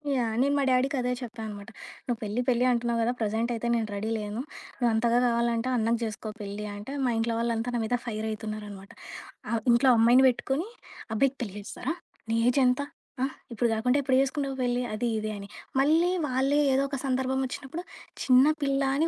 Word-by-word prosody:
Yeah! 235 -3 0
నేను 280 +2 +2
మా 280 - +2
డాడికి 260 +2 +2
అదే 250 0 0
చెప్పానమాట. 220 -3 -7 0.4
"నువ్వు 240 -3 -2
పెళ్లి 215 +3 -1
పెళ్లి 245 0 +3
అంటున్నావు 235 -1 0
కదా! 235 - +2
ప్రెజెంటయితే 225 +2 -1
నేను 225 -2 0
రెడీ 210 +2 -3
లేను. 210 +2 -4 0.4
నువ్వంతగా 235 -1 +2
గావాలంటే, 235 0 +1
అన్నకి 230 +1 +2
జేసుకో 215 -1 -4
పెళ్లి 205 +1 -5
అంటే" 205 +6 -8
మా 245 - +2
ఇంట్లో 230 0 0
వాళ్ళంతా 230 +1 -1
నా - - +1
మీద 245 +3 +1
ఫైరయితున్నారనమాట. 215 -3 -5 0.6
ఆహ్, 230 -1 0
"ఇంట్లో 240 +3 +5
అమ్మాయిని 240 +4 +6
బెట్టుకొని, 270 - -2 0.5
అబ్బాయికి 270 +4 +2
పెళ్లి 200 -3 -7
జేస్తారా? 225 +9 -4 0.3
నీ 225 - +1
ఏజెంత? 255 +1 +3 0.4
ఆ! - - +4 0.3
ఇప్పుడు 235 +1 +1
గాకుండా 250 +5 +2
ఎప్పుడు 260 -1 +2
చేసుకుంటావు 275 0 -1
పెళ్లి? 245 0 +1
అది 240 +3 -1
ఇది" 215 0 -3
అని. 200 - -8 0.3
మళ్ళీ 325 +5 +4 0.2
వాళ్ళే 270 +2 +2
ఏదో 270 +1 +3
ఒక 275 - -3
సందర్భం 265 0 0
ఒచ్చినప్పుడు 275 +7 -6 0.4
"చిన్న 255 0 +6 0.2
పిల్ల" 275 0 +1 0.2
అని 320 +3 +2
240 Hz, 170 wpm, -28 LUFS, 220-265 Hz, 0.6 s, అమ్మాయిని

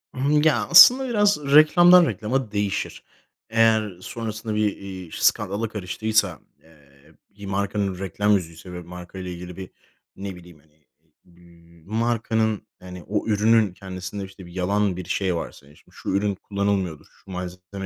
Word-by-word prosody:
Hımm, 145 +3 +2
ya, 155 -1 +2
aslında 250 +9 +8
biraz 205 -3 +3 0.2
reklamdan 175 +3 +7
reklama 115 - -2
değişir. 100 -2 -3 0.5
Eğer 110 -4 +2
sonrasında 110 0 -5
bir, 105 -1 0
iii, 95 -3 -9
skandala 105 +2 0
karıştıysa, 110 +1 -1 0.2
eee, 75 -1 -23 0.2
bir 100 - -9
markanın 100 -1 -2
reklam 100 +2 -1
yüzüyse 90 -2 -2
ve 90 - -6
markayla 90 +1 -9
ilgili 90 0 -9
bir, 95 -1 -8 0.5
ne 95 -1 -7
bileyim, 85 -3 -15
hani, 75 0 -30
eee, 75 -1 -40 0.2
bir 85 -1 -21 0.2
markanın 110 -1 -1
hani 90 -1 -10
o 105 +3 -3
ürünün 110 -1 +3
kendisinde 95 +1 -7
işte 95 0 -13
yalan 95 +2 -1
bir 90 - -6
şey 95 -1 -1
varsa 80 - -7
yani 75 +1 -20
şimdi - - -24
"şu - - -7
ürün 100 +1 0
kullanılmıyordur, 100 -5 -2 0.2
şu 95 - -12
malzeme 90 +2 -7
100 Hz, 150 wpm, -23 LUFS, 90-110 Hz, 0.5 s, aslında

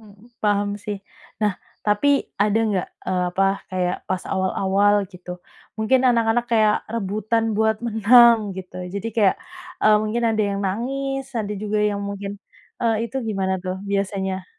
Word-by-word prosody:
Mhm, 210 +1 -18 0.2
paham 205 -1 +2 0.2
sih. 205 -1 -3 0.4
Nah, 210 -3 +1 0.3
tapi 210 +7 +2 0.3
ada 210 +1 +2
enggak, 200 -4 0 0.2
eee, 180 -1 0
apa 195 +2 +2 0.3
kayak 180 -1 0
pas 185 -1 -1
awal-awal 195 +2 +2 0.2
gitu? 180 0 -9 0.4
Mungkin 235 +4 +3
anak-anak 235 -1 +3
kayak 215 -2 +4 0.2
rebutan 215 +1 -1
buat 220 0 +2
menang 225 -1 +5
gitu. 185 -1 -8 0.2
Jadi 200 +3 -3
kayak, 205 -4 +4 0.5
eee, 215 0 +6
mungkin 220 +3 -1
ada 215 - +2
yang 200 0 -2
nangis, 270 +6 -2
ada 215 -3 -2
juga 210 0 -1
yang 210 -1 0
mungkin, 200 0 -5 0.4
eee, 230 0 +1
itu 250 - -7
gimana 195 -3 -1
tuh 185 0 -2
biasanya 190 -1 -2
210 Hz, 150 wpm, -22 LUFS, 195-225 Hz, 0.5 s, eee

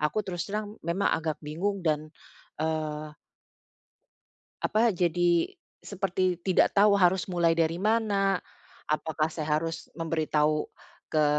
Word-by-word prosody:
aku 150 +8 0
terus 175 0 -4
terang 210 0 -4
memang 170 +4 0
agak 155 -1 -1
bingung 180 +5 -2
dan, 155 -1 0 0.5
eee 155 -1 -3 1.5
apa, 220 -1 +2
jadi 175 - +2 0.3
seperti 185 -2 -1
tidak 185 +1 +3
tahu 200 0 +5
harus 185 -1 +3
mulai 175 -3 +2
dari 165 0 +1
mana? 200 -1 +1 0.5
Apakah 155 0 0
saya 155 -1 -1
harus 165 0 -5
memberi 165 -1 -2
tahu 150 0 +2 0.5
ke 155 -1 +3
170 Hz, 120 wpm, -28 LUFS, 155-195 Hz, 1.5 s, tahu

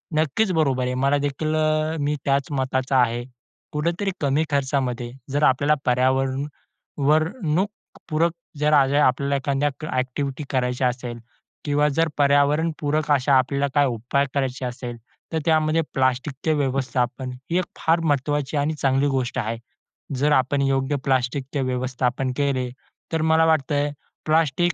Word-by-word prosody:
नक्कीच, 160 +7 +1
बरोबर 140 -7 +1
आहे. 125 0 -1
मला 140 +1 +3
देखील 155 +2 -1
अ, 155 0 +1
मी 145 +1 0
त्याच 140 0 +1
मताचा 130 -1 0
आहे. 120 0 0 0.5
कुठेतरी 170 +6 -1
कमी 145 +2 +2
खर्चामध्ये 130 -4 -1 0.2
जर 145 +2 0
आपल्याला 145 +3 +4
पर्यावरण, 130 +2 +1 0.5
वरणूक, 155 - +1 0.4
पूरक 165 +2 +2 0.3
जर 150 +1 +2
आज 135 -2 +5
हे - - +3
आपल्याला 140 +1 +2
एखाद्या 140 +1 0 0.2
ॲक्टिव्हिटी 130 +3 -2
करायच्या 125 -1 0
असेल 125 -1 -4 0.5
किंवा 145 0 +2
जर 165 0 +3
पर्यावरणपूरक 150 +1 +2
अशा 140 0 +3
आपल्याला 140 +2 +1
काही 145 -1 +4
उपाय 125 +4 0
करायचे 130 -2 -1
असेल, 125 -1 -5 0.4
तर 160 - +1
त्यामध्ये 155 0 +3
प्लास्टिकचे 135 +3 0
व्यवस्थापन 130 -2 -1 0.2
ही 175 - +2
एक 185 - -1
फार 165 +1 +2
महत्वाची 145 -1 0
आणि 145 +2 +1
चांगली 135 -1 +1
गोष्ट 130 -2 -1
आहे. 115 0 -2 0.6
जर 145 +3 +1
आपण 140 0 +2
योग्य 135 +1 +1
प्लास्टिकचे 135 +2 0
व्यवस्थापन 130 0 -1
केले, 135 -3 0 0.4
तर 160 - +1
मला 160 0 +4
वाटतयं, 145 -2 +1 0.3
प्लास्टिक 160 +2 +2
140 Hz, 140 wpm, -23 LUFS, 130-155 Hz, 0.6 s, आज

